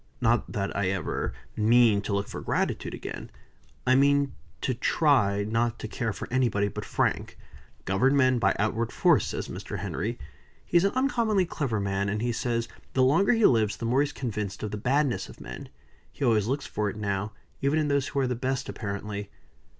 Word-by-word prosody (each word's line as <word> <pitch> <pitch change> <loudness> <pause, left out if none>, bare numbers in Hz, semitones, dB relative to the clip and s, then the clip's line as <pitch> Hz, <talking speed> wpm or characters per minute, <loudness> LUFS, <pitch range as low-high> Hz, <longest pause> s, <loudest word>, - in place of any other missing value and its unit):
Not 120 -1 +1
that 100 -3 -2
I 100 -1 +1
ever 95 -2 -2 0.2
mean 110 -1 +4
to 100 - -3
look 100 0 -1
for - - -6
gratitude - - -1
again. - - -7 0.6
I 130 - +4
mean 140 +1 +3 0.3
to 130 - 0
try, 120 -6 +2
not 115 +2 0
to - - -6
care 115 0 -2
for - - -6
anybody 115 -6 +2
but - - -6
Frank. - - -1 0.5
'Govern 125 +9 +3
men 130 -2 +4
by 95 -3 +2
outward 110 +2 0
force,' 165 - +3
says - - -4
Mr. - - -6
Henry. - - -3 0.5
He - - -7
is 170 - +4
an 200 - +1
uncommonly 235 -7 +2
clever 135 -10 -2
man, 100 0 -1
and 105 +1 -1
he 120 +2 0
says, 115 0 -1 0.3
the 130 - +3
longer 160 - +4
he 225 -2 +3
lives, 110 -3 +3
the 115 - -5
more 125 +4 +3
he 145 - +2
is - - -8
convinced 105 -6 -4
of 105 - -3
the 105 - -3
badness 130 +4 0
of - - -13
men. - - -8 0.4
He 140 - -3
always 110 -4 +3
looks 135 +3 -1
for 105 0 -2
it - - -6
now, 100 0 -2 0.3
even 140 +3 +2
in 155 -1 +1
those 140 -1 +1
who 140 - -2
are 130 - +1
the 125 - 0
best, 130 +2 -2
apparently." 100 -1 -5
120 Hz, 200 wpm, -27 LUFS, 105-140 Hz, 0.6 s, mean